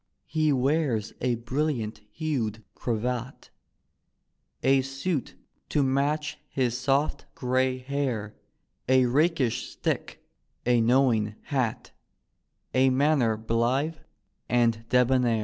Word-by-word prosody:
He 155 -1 +1
wears 135 -4 +1
a 125 -1 +1
brilliant 120 -3 -2
hued 115 -8 -2
cravat, 125 +2 -3 1.1
A 135 0 +4
suit 135 +3 -3 0.3
to 145 - +2
match 145 +3 0
his 125 -3 0
soft 135 +4 0
grey 130 0 +1
hair, 130 -5 -2 0.6
A 130 -1 +5
rakish 140 -1 +1
stick, - - -3 0.4
a 120 -1 +4
knowing 115 -3 +3
hat, 125 -4 -2 0.8
A 130 +1 +4
manner 130 -4 +2
blithe 120 +8 0 0.5
and 115 -1 +2
debonair. 125 -2 +3
130 Hz, 95 wpm, -27 LUFS, 115-140 Hz, 1.1 s, A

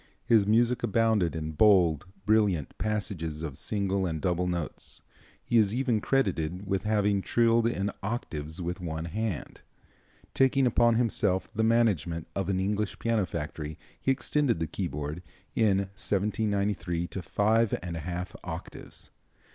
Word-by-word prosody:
His 115 -4 +4
music 120 +3 +3
abounded 110 -6 +2
in 80 -1 -3
bold, 85 -2 +4 0.2
brilliant 105 -8 +2
passages 95 -7 -2
of 75 -4 -4
single 100 +1 -1
and 80 -2 -3
double 90 +3 0
notes. 85 -4 -5 0.4
He 120 - +4
is 105 0 +2
even 125 -4 +1
credited 95 -9 0
with 95 0 -1
having 105 -2 +2
trilled 115 +2 +3
in 100 -3 -1
octaves 80 -8 -4
with 90 0 -4
one 80 -2 -4
hand. 100 0 -4 0.7
Taking 135 0 +3
upon 120 -1 +4
himself 105 -5 +1
the 110 0 0
management 105 -8 +2
of 95 -1 -1
an 95 -1 +1
English 105 +2 -1
piano 115 -5 0
factory, 75 0 -5 0.2
he - - -1
extended 135 -1 +1
the 80 - 0
keyboard, 75 +2 -4 0.3
in 105 -4 +3 0.2
1793, 100 -3 -1
to 95 - -5
five 110 +5 +2
and 85 -2 -4
a - - -3
half 90 +3 -5
octaves. - - -8
100 Hz, 140 wpm, -28 LUFS, 85-110 Hz, 0.7 s, His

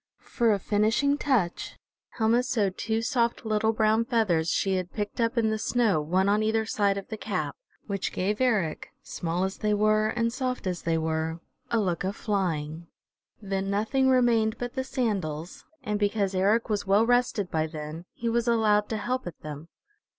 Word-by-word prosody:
For 235 -3 +2
a 205 - +3
finishing 215 +8 +2
touch 225 -12 0 0.4
Helma 230 +1 +3
sewed 210 -6 0
two 225 0 -1
soft 235 -1 0
little 220 0 +2
brown 220 0 +2
feathers 210 -10 +1
she 190 +1 +1
had 185 -1 -4
picked 210 +2 -3
up 230 +2 0
in 220 -2 +2
the 220 - -1
snow 220 -8 +2
one 185 +6 +1
on 205 +1 +3
either 220 0 +1
side 205 -4 +1
of 195 - -7
the 220 - -5
cap, 170 -10 -3 0.3
which 200 -2 -2
gave 205 +5 -1
Eric, 210 -11 0
small 175 +2 -2
as 190 0 -2
they 210 -1 +1
were 215 +1 +3
and 230 +1 0
soft 255 -2 -3
as 180 -2 -2
they 165 -1 0
were, 160 +1 -2 0.3
a 230 - +2
look 185 -3 -1
of 190 +2 -2
flying. 170 -6 -2 0.6
Then 195 0 -2
nothing 225 +7 +1
remained 235 -3 +3
but 245 0 -5
the 260 - -2
sandals, 195 - -3 0.2
and 210 0 -1
because 205 -1 0
Eric 200 +5 +2
was 205 -2 -2
well 200 +3 +4
rested 240 -5 +1
by 160 0 0
then, 155 +2 -7
he 235 - -4
was 235 +1 +1
allowed 215 -3 +3
to 220 - -1
help 250 0 -2
at 170 - -8
them. 150 +1 -8
210 Hz, 185 wpm, -27 LUFS, 185-230 Hz, 0.6 s, well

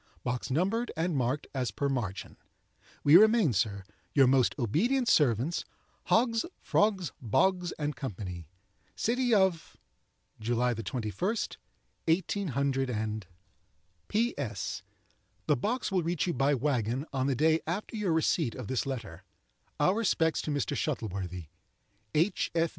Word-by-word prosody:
Box 125 +2 -2
numbered 195 - 0
and 165 0 0
marked 130 +2 0
as 130 -3 -1
per 140 - -2
margin. 115 -8 -3 0.7
"We 145 +4 +8
remain, 215 - +5
sir, 100 -1 0 0.3
"Your 135 -2 +7
most 130 -1 +3
ob'nt 220 - +1
ser'ts, 145 - +2 0.4
"HOGGS, 230 -1 +3 0.2
FROGS, 200 -6 +1
BOGS, 175 - +2 0.2
& 150 - -3
CO. 130 +1 -4 0.8
"City 245 +2 0
of—, 190 -5 +1 0.6
June 115 +2 -1 0.2
21, 115 +3 -4 1.0
18—. 135 - 0 0.8
"P.S.—The 140 - -3
box 225 - -2
will 185 -2 +2
reach 170 0 -1
you 175 - -1
by 140 0 +2
wagon, 130 -1 0
on 130 0 0
the 135 - +1
day 160 +4 +3
after 195 +7 -3
your 210 -5 0
receipt 160 -5 +1
of 125 - -6
this 130 +1 -1
letter. 110 -10 -5 0.6
Our 150 +5 +4
respects 185 -7 +1
to - - -5
Mr. 145 -2 -1
Shuttleworthy. 95 - -3 0.7
"H. 165 +7 +2
145 Hz, 120 wpm, -30 LUFS, 120-185 Hz, 1.0 s, We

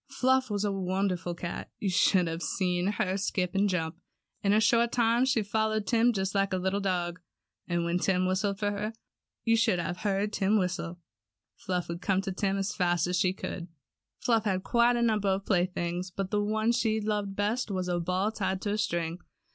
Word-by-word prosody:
Fluff 260 -1 +2
was 205 -1 -1
a 205 - +1
wonderful 185 -2 -1
cat. 170 0 -5
You 195 - -1
should 180 0 +4
have 165 +1 -4
seen 180 0 0
her 190 -2 0
skip 185 -2 -1
and 200 +1 +2
jump. 165 -3 -2 0.4
In 200 - +2
a 210 - +5
short 230 +2 +3
time 235 +1 +3
she 245 -4 +2
followed 215 +1 0
Tim 235 +2 +3
just 195 -3 -2
like 195 -1 +1
a - - +2
little 190 +2 0
dog. 180 -3 -1 0.5
And 175 -1 0
when 170 +1 0
Tim 185 0 +1
whistled 195 +2 0
for 205 0 0
her 210 +2 -3 0.5
(you 230 -1 +3
should 225 -4 +3
have 175 0 -3
heard 205 0 -1
Tim 200 +3 +2
whistle). 180 -2 -2 0.6
Fluff 180 -2 -3
would 170 +1 -5
come 190 0 +1
to 195 0 -4
Tim 195 +1 -1
as 195 +1 -1
fast 175 -2 +2
as 180 +1 -1
she 185 0 +2
could. 180 -2 -6 0.5
Fluff 225 -2 +1
had 190 -2 0
quite 235 +2 +3
a 235 - +1
number 215 -3 +1
of 195 0 0
playthings, 180 -1 0
but 190 +1 -4
the 210 -1 +2
one 220 +2 +1
she 225 -2 +1
loved 205 -2 -2
best 215 +5 0
was 185 -2 -2
a 175 -1 0
ball 185 +5 0
tied 190 -3 -2
to 205 - -1
a 210 - -1
string. 170 -5 -1
195 Hz, 205 wpm, -29 LUFS, 180-215 Hz, 0.6 s, a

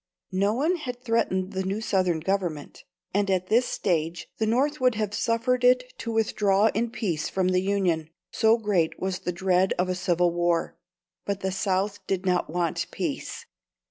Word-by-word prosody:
No 200 +3 +2
one 320 +8 +1
had 250 -6 -6
threatened 200 -5 0
the 190 - -1
new 195 +2 -2
Southern 185 -6 +1
Government, 175 -5 -3 0.3
and 200 0 +1
at 185 -1 0
this 240 +3 +3
stage 165 -1 -1
the 220 - +1
North 275 +6 +1
would 250 -2 +3
have 210 -1 -2
suffered 230 +3 0
it 250 0 +3
to 230 - -4
withdraw 210 -1 +2
in 230 +3 0
peace 195 -10 -2
from 185 -1 0
the 185 0 +3
Union, 185 -5 0 0.2
so 225 0 +4
great 200 -8 0
was 185 -1 -2
the 180 -1 -3
dread 185 +1 +2
of 180 +1 0
a - - +1
civil 180 -1 +1
war. 175 -1 0 0.5
But 200 -1 -3
the 190 - -1
South 195 +1 -1
did 190 -1 -1
not 180 -3 +1
want 170 0 -1
peace. - - -4
195 Hz, 175 wpm, -26 LUFS, 180-225 Hz, 0.5 s, so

